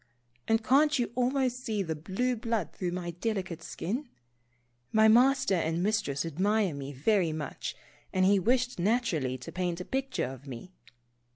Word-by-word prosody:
And 225 0 +2
can't 290 +5 +4
you 245 - -1
almost 255 0 0
see 210 -3 -1
the 165 -3 -2
blue 195 +11 -1
blood 230 -4 -2
through 180 -2 -3
my 175 -1 -3
delicate 185 -2 -3
skin? 235 - -4 0.8
My 220 0 +5
Master 260 +1 +5
and 165 -1 0
Mistress 200 -9 0
admire 190 +3 +1
me 140 0 -6
very 170 - +2
much, 155 -3 -5 0.4
and 185 0 +2
he 200 +1 +5
wished 245 +3 +1
naturally 175 - +1
to 125 - -9
paint 180 -1 -2
a 180 - -5
picture 270 0 -1
of 130 +2 -8
me. 135 +8 -8
195 Hz, 160 wpm, -29 LUFS, 170-245 Hz, 0.8 s, My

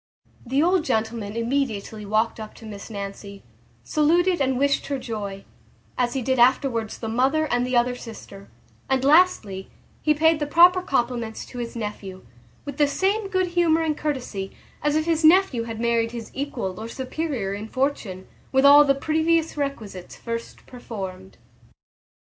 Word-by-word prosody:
The 270 +5 +2
old 360 0 +3
gentleman 220 -4 -2
immediately 230 -4 -2
walked 220 +2 +1
up 215 -1 -8
to 225 - -13
Miss 205 -1 -9
Nancy, 200 -1 -7 0.4
saluted 345 - +2
and 265 -1 +1
wished 280 +1 +1
her 280 - -1
joy, 205 -6 -6 0.5
as 245 +1 0
he 265 - -1
did 260 +1 0
afterwards 240 -2 +2
the 225 - -5
mother 265 +7 +2
and 245 +1 +1
the 255 -1 +1
other 245 +1 +2
sister; 215 -5 -11 0.4
and 265 0 +1
lastly, 280 - +3 0.3
he 305 0 +2
paid 320 +1 +3
the 295 - -2
proper 355 +4 +6
compliments 240 -7 -2
to 245 - -9
his 235 0 -5
nephew, 205 - -6 0.4
with 285 -1 -6
the 295 - +4
same 395 +7 0
good 370 -2 0
humour 335 -2 +2
and 310 -2 0
courtesy, 250 -11 -4 0.3
as 295 +1 +1
if 310 0 +1
his 330 -1 0
nephew 315 -8 +4
had 225 -1 -6
married 230 0 +1
his 235 -2 -7
equal 240 -9 -4
or 220 - -5
superior 260 -4 -3
in 205 +2 -6
fortune, 240 -9 -2 0.2
with 265 +1 +3
all 290 +1 +9
the 275 -1 +3
previous 320 +3 +1
requisites 225 -11 -5
first 230 0 -6
performed. 190 -6 -8
250 Hz, 160 wpm, -24 LUFS, 220-300 Hz, 0.5 s, all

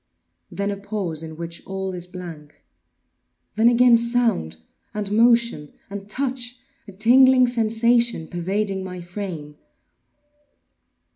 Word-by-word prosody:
Then 200 +1 -2
a 200 - -4
pause 200 -6 -4
in 160 -1 -9
which 170 0 -7
all 190 0 -4
is 180 -1 -6
blank. 170 -5 -10 0.9
Then 225 +2 +4
again 245 0 +6
sound, 235 - 0 0.4
and 205 -1 -3
motion, 235 -8 +2 0.2
and 200 0 -7
touch—a 250 -5 -6
tingling 255 +5 +6
sensation 235 -4 +1
pervading 190 +2 -2
my 180 -1 -7
frame. 175 -5 -7
200 Hz, 110 wpm, -22 LUFS, 175-235 Hz, 0.9 s, again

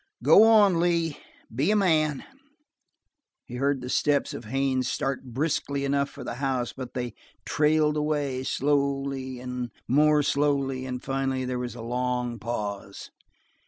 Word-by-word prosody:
"Go - - +7
on, 205 -6 +5
Lee. 170 -3 +1 0.3
Be 140 - +1
a 215 - +3
man." 155 -7 +2 1.2
He 125 - -7
heard 140 0 0
the 125 - -6
steps 145 +1 +1
of 120 - -7
Haines 130 +1 0
start 135 0 -2
briskly 140 +2 -2
enough 140 0 +1
for 140 - -10
the - - -4
house, 130 -3 -1
but 130 -2 -8
they 120 -3 -3 0.3
trailed 150 +2 +2
away, 145 -3 -1
slowly 135 -1 -1
and 125 -1 -5 0.2
more 150 +3 +4
slowly, 140 -2 0
and 125 -1 -5
finally 135 -1 -1
there 125 0 -2
was 125 -1 -5
a 115 - -8
long 125 0 -2
pause. 105 -4 -5
135 Hz, 145 wpm, -26 LUFS, 125-150 Hz, 1.2 s, Go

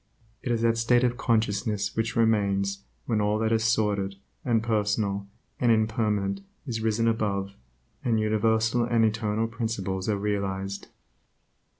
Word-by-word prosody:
It 125 - -2
is 115 -1 0
that 115 0 +2
state 120 +2 +3
of 125 -1 +2
consciousness 105 -3 0
which 115 0 -1
remains 100 -3 +1 0.2
when 110 -2 +1
all 105 +1 +1
that 110 0 0
is 110 -1 +2
sordid, 105 -3 +1 0.3
and 115 -5 +1
personal, 105 -3 0 0.3
and 120 -2 +3
impermanent 105 -3 +1 0.2
is 115 -5 -3
risen 110 +1 +1
above, 100 -3 0 0.5
and 115 -3 +2
universal 110 +2 +2
and 115 -1 +3
eternal 110 0 0
principles 110 -4 -3
are 105 - +1
realized. 100 -1 -2
110 Hz, 135 wpm, -27 LUFS, 100-115 Hz, 0.5 s, state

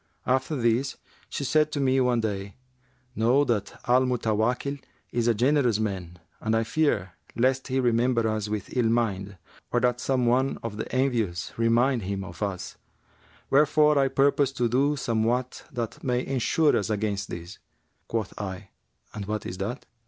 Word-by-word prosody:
After 130 +4 +1
this, 120 +1 +1 0.3
she - - -3
said 155 +2 +2
to 145 - -1
me 135 -1 +3
one 125 -2 +2
day, 100 -2 -3 0.6
'Know 120 +6 +3
that 105 -7 -2
Al 125 +1 +5
Mutawakkil 125 +4 0 0.3
is 120 -1 0
a 120 - +3
generous 125 -1 +3
man 95 -5 -3 0.2
and 110 0 0
I 110 - +2
fear 130 - 0 0.2
lest 130 +2 +1
he 130 0 0
remember 120 -1 +2
us 110 -1 -2
with 105 +2 -4
ill 120 -3 +2
mind, 100 -4 -1 0.3
or 120 - +3
that 125 0 +2
some 130 -1 +1
one 130 +3 +2
of 110 -2 -5
the - - -5
envious 115 - 0
remind 115 +2 +2
him 95 0 -3
of 85 +1 -10
us; 100 -3 -4 0.7
wherefore 150 +1 +5
I 135 - +4
purpose 140 0 +2
to 120 -2 +1
do 140 +5 +2
somewhat 120 0 -1
that 120 -5 -5
may 125 -1 0
ensure 135 +4 +2
us 105 - 0
against 105 -2 -1
this.' 85 +3 -8 0.5
Quoth 110 -4 -2
I, 95 0 -6 0.4
'And 105 -2 -6
what 105 0 -3
is 90 - -6
that? 110 +7 -4
120 Hz, 165 wpm, -26 LUFS, 105-130 Hz, 0.7 s, Al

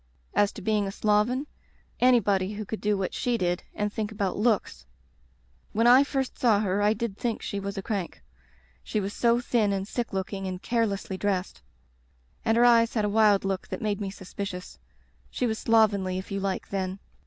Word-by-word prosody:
As 205 0 +3
to - - -9
being 210 -2 +1
a - - -3
sloven, 215 +7 +1 0.5
anybody 205 -6 +3
who 210 +1 -5
could 220 - -5
do 210 -1 +1
what 190 -1 -2
she 245 -1 0
did 175 -2 0
and 210 0 -2
think 215 -1 -3
about 200 -3 -2
looks 205 - 0 0.4
" 60 0 -37
When 225 +2 +2
I 250 +3 +8
first 270 -2 -3
saw 225 -5 +4
her 200 -1 0
I 210 +1 +4
did 220 -2 -3
think 235 -2 -2
she 200 - -3
was 200 +1 -5
a 195 - -3
crank. 195 -5 -4 0.6
She 215 - -2
was 200 0 -3
so 235 0 +3
thin 235 -4 +1
and 195 0 -2
sick 240 +2 -3
looking, 195 0 -3
and 185 -1 -4
carelessly 205 -4 -1
dressed. 190 - -2 0.8
And 225 0 +2
her 240 - +6
eyes 230 -1 +5
had 215 -2 +2
a - - 0
wild 210 -2 +4
look 195 -1 -2
that - - -5
made 210 -2 -2
me 195 - -2
suspicious. 190 -1 -7 0.5
She 250 - -2
was 220 -2 -1
slovenly 200 -5 +3
if 190 - -7
you 195 - -1
like, 195 -1 -3
then. 190 -1 -2
205 Hz, 200 wpm, -27 LUFS, 195-225 Hz, 0.8 s, I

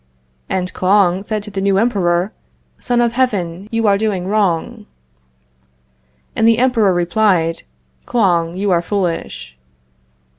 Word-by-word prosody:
And 185 -1 -2
Kouang 185 -1 +2
said 215 0 -3
to 210 - -9
the 195 -1 -3
new 195 0 +2
Emperor: 195 -3 +1 0.5
"Son 245 -1 0
of 235 -1 +2
Heaven, 200 -7 -1
you 230 -1 0
are 200 -1 +3
doing 205 -5 -1
wrong." 205 +2 -1 1.5
And 225 - +2
the 230 -1 +4
Emperor 235 -5 +2
replied: 175 -1 +1 0.5
"Kouang, 175 -6 +1
you 200 0 0
are 170 -1 +3
foolish." 175 - -3
200 Hz, 125 wpm, -17 LUFS, 175-220 Hz, 1.5 s, the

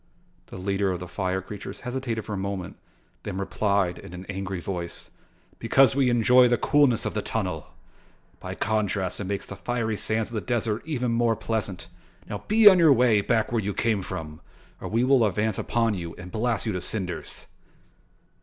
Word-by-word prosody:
The - - -9
leader 100 +1 0
of 90 - -3
the 90 - -7
fire 95 +1 -2
creatures 100 +1 -8
hesitated 125 -3 -3
for 105 - -5
a - - -1
moment 95 -2 -4 0.5
then 95 -2 -5
replied 100 -2 0
in 95 -2 -10
an 90 +1 -8
angry 95 -1 -4
voice: 85 -1 -6 0.5
"Because 135 -4 +4
we 135 -2 +2
enjoy 125 +1 +5
the 120 0 +2
coolness 145 -6 +3
of - - -2
the 105 - -1
tunnel. 90 -9 -3 0.7
By - - -6
contrast 105 -3 -1
it 100 - -3
makes 100 +1 -3
the 100 - -8
fiery 110 +2 -2
sands 110 +2 -1
of - - -10
the 110 - -2
desert 115 -2 -1
even 125 -6 -1
more 115 -1 +2
pleasant. 105 -5 -3 0.4
Now, 105 - -4
be 215 0 +6
on 190 -3 +9
your 165 -3 +6
way 120 -5 +4
back 110 +4 0
where 115 -2 +1
you 100 0 -3
came 110 -3 +1
from 80 -3 -7 0.4
or - - -6
we 115 +3 +1
will 130 -2 +4
advance 105 0 0
upon 115 -2 +1
you 85 -4 -5
and 90 0 -10
blast 115 0 -1
you 110 - 0
to 90 -2 -3
cinders." 90 -3 -4
105 Hz, 190 wpm, -26 LUFS, 95-120 Hz, 0.7 s, on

